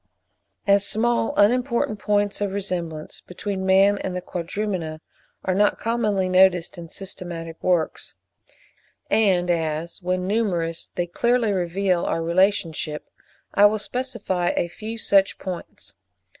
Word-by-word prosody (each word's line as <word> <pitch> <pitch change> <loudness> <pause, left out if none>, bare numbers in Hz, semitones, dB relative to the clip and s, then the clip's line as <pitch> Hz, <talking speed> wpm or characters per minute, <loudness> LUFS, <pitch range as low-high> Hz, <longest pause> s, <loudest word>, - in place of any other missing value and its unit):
As 200 0 +4
small 225 +2 +1
unimportant 235 0 +2
points 205 0 0
of 200 -2 -1
resemblance 170 -6 -4
between 190 +1 -4
man 195 +2 +5
and 185 - -4
the 180 - -3
Quadrumana 175 -2 -3 0.5
are 185 - +1
not 205 +2 +3
commonly 215 -5 0
noticed 185 -2 +4
in 170 -1 -9
systematic 170 -4 -7
works, 175 -3 0 1.0
and 185 -5 +3
as, 165 +1 -2
when 180 0 -1
numerous, 180 -6 -1
they 175 - 0
clearly 235 +4 +1
reveal 180 0 0
our 165 - -1
relationship, 170 -3 0 0.4
I 205 +1 +7
will 215 +1 0
specify 205 -6 -2
a 170 - 0
few 220 +6 -6
such 195 -3 +3
points. 185 -2 -7
190 Hz, 125 wpm, -23 LUFS, 175-205 Hz, 1.0 s, I